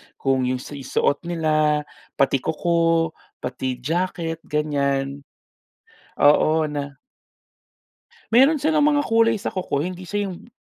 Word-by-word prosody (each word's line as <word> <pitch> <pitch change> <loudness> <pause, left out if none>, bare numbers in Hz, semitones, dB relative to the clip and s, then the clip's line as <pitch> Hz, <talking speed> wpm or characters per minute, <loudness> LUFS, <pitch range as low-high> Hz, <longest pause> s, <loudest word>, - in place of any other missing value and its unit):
Kung 130 -2 0
'yong 130 0 -2
si 145 -1 -8
suot 145 +4 -1
nila, 155 -3 +1 0.3
pati 135 0 +2
kuko, 165 +2 +1 0.3
pati 130 0 -3
jacket 165 0 -2
ganyan. 140 -2 -1 0.9
Oo 155 +2 +4
na 145 -2 -4 1.4
Meron 270 +7 +6
silang 305 -1 +3
mga 290 -1 +2
kulay 230 -2 +3
sa 205 - -4
kuko. 160 -6 -2
Hindi 180 0 -6
siya 205 -2 -2
yung 175 - -11
155 Hz, 120 wpm, -22 LUFS, 140-180 Hz, 1.4 s, Meron